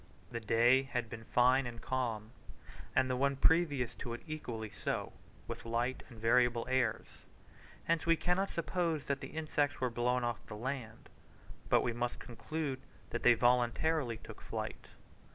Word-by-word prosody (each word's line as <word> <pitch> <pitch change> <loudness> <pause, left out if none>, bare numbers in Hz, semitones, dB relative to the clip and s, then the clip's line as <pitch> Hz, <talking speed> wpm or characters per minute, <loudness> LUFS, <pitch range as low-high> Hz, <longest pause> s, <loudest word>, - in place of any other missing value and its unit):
The 115 - -3
day 120 +4 +4
had 125 -4 -3
been 115 0 -7
fine 125 +3 +4
and 120 -1 -7
calm, 115 -4 -2 0.6
and 130 -1 +4
the 130 - 0
one 140 +2 +2
previous 145 -5 +3
to 120 - -5
it - - -11
equally 115 -9 -5
so, - - -3 0.3
with - - -6
light 120 +3 -1
and 120 - -12
variable 120 +1 +3
airs. 130 -3 -1 0.6
Hence 165 -1 0
we 165 - +6
cannot 180 +4 +1
suppose 170 -3 -1
that 140 0 -1
the - - -5
insects 150 -2 -1
were 125 -2 0
blown 125 +1 +1
off 120 -1 -2
the 105 - -7
land, 125 0 -5 0.6
but - - +5
we 120 - 0
must 120 +1 -2
conclude 135 +3 -4 0.3
that - - -2
they 120 - +7
voluntarily 125 +3 +2
took - - -11
flight. - - -5
125 Hz, 160 wpm, -34 LUFS, 120-140 Hz, 0.6 s, they